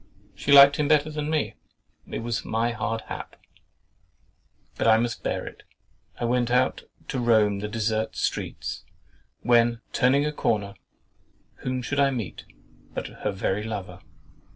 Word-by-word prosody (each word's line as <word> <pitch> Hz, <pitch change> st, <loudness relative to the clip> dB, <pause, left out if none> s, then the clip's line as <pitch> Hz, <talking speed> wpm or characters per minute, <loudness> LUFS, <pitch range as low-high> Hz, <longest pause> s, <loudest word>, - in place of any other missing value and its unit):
She 100 Hz, -, -3 dB
liked 140 Hz, 0 st, +9 dB
him 150 Hz, -, +1 dB
better 155 Hz, 0 st, +3 dB
than 150 Hz, 0 st, -3 dB
me—it 155 Hz, -2 st, -5 dB
was 115 Hz, 0 st, -2 dB
my 115 Hz, +2 st, 0 dB
hard 115 Hz, -1 st, -2 dB
hap, -, -, -8 dB, 1.4 s
but -, -, 0 dB
I 110 Hz, 0 st, +7 dB
must 120 Hz, +1 st, -2 dB
bear -, -, -2 dB
it. -, -, -10 dB, 0.6 s
I 120 Hz, -, -1 dB
went 120 Hz, 0 st, +1 dB
out 125 Hz, +1 st, +2 dB, 0.3 s
to 130 Hz, -, -2 dB
roam 110 Hz, -4 st, +3 dB
the 105 Hz, -, -3 dB
desert 110 Hz, 0 st, -1 dB
streets, -, -, -3 dB, 0.6 s
when, 120 Hz, -1 st, +3 dB
turning 140 Hz, +3 st, +3 dB
a 150 Hz, -, 0 dB
corner, 105 Hz, -7 st, -1 dB, 0.8 s
whom 130 Hz, 0 st, -3 dB
should 145 Hz, +4 st, -2 dB
I 140 Hz, -1 st, +5 dB
meet 120 Hz, -8 st, -5 dB, 0.5 s
but -, -, -3 dB, 0.2 s
her -, -, 0 dB
very 95 Hz, +1 st, -1 dB
lover? 100 Hz, -5 st, -6 dB
120 Hz, 145 wpm, -25 LUFS, 110-135 Hz, 1.4 s, liked